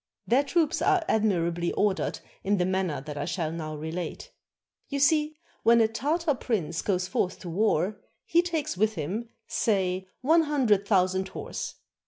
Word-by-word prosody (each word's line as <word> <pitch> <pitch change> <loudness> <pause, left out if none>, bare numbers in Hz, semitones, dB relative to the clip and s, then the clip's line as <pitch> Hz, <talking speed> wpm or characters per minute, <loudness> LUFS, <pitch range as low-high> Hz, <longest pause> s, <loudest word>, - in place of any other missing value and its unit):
Their 260 +4 +3
troops 320 +2 +1
are 375 -4 +3
admirably 175 -5 +1
ordered 205 -2 0 0.2
in 200 +1 +2
the 180 - +2
manner 185 -6 -1
that 145 0 -6
I 145 - -2
shall 165 -2 -2
now 155 -2 -5
relate. 160 +3 -5 0.6
You 280 - -3
see, 300 +2 +3 0.2
when 235 +1 +5
a 225 - +5
Tartar 295 +8 0
prince 180 - -2
goes 185 -2 0
forth 185 0 -1
to 175 - -6
war, 200 +1 +1 0.2
he 340 - +4
takes 330 - -2
with 215 +3 +1
him, 195 +9 -3 0.2
say, 190 -3 0
one 320 +6 +5
hundred 235 -10 +2
thousand 190 -1 +2
horse. 190 - -6
200 Hz, 160 wpm, -27 LUFS, 180-265 Hz, 0.6 s, when